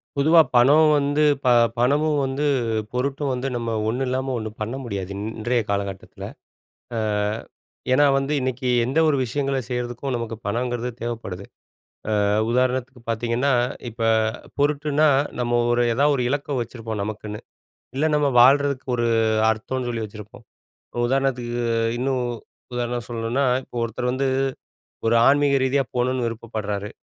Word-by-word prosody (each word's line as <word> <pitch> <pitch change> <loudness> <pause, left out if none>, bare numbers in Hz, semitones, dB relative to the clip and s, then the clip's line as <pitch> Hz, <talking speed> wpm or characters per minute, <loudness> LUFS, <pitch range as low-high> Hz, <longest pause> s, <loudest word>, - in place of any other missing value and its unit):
பொதுவா 160 +4 +6
பணம் 145 +6 +6
வந்து 145 +1 +1 0.2
ப - - +2 0.3
பணமும் 145 +4 +2
வந்து, 135 +2 -2 0.5
பொருட்டும் 140 +2 -1
வந்து, 125 +1 -3
நம்ம 115 -1 -3 0.2
ஒண்ணு 125 +4 -1
இல்லாம 130 +1 -1
ஒண்ணு 110 -1 -4
பண்ண 110 +4 -3
முடியாது 100 -6 -4 0.3
இன்றைய 120 +2 +1
காலகட்டத்தில. 100 -1 -4 0.7
ஆ, - - 0 0.9
ஏனா 145 +3 +5
வந்து 135 +2 -1
இன்னைக்கு 130 0 -2 0.2
எந்த 135 +6 -1
ஒரு 150 - +3
விஷயங்கள 135 +2 -1
செய்றதுக்கும் 125 +2 -3
நமக்கு 115 -1 -4
பணங்கறது 120 +3 -2
தேவைப்படுது. 115 -5 -5 0.8
ஆ - - +2 0.3
உதாரணத்துக்கு 130 0 0
பார்த்தீங்கன்னா, 120 +4 0 0.4
இப்ப 115 +1 -10 0.6
பொருட்டுன்னா, 150 +1 +2 0.3
நம்ம 120 0 +1
ஒரு 120 0 +2
எதா 140 +5 +2
ஒரு 130 - -1
இலக்கு 145 +1 -2
வச்சிருப்போம் 115 -2 -5
நமக்குன்னு, 105 0 -6 0.6
இல்ல 150 +3 +2
நம்ம 150 -1 +2
வாழ்றதுக்கு 140 +1 +4
ஒரு 120 0 0 0.4
அர்த்தம்ன்னு 120 +3 -3
சொல்லி 115 -2 -3
வச்சிருப்போம், 105 +2 -12 0.6
உதாரணத்துக்கு 125 -2 -1 0.4
இன்னும் 130 0 0 0.5
உதாரணம் 120 -1 -2
சொல்லணுனா, 120 +4 -1 0.2
இப்போ - - -16
ஒருத்தர் 120 +2 -2
வந்து, 135 +1 0 0.8
ஒரு 115 - +3
ஆன்மீக 140 0 +4
ரீதியா 135 +1 +2
போணுனு 125 0 0
விருப்பப்படுறாரு, 110 -3 -4
125 Hz, 130 wpm, -23 LUFS, 115-135 Hz, 0.9 s, பொதுவா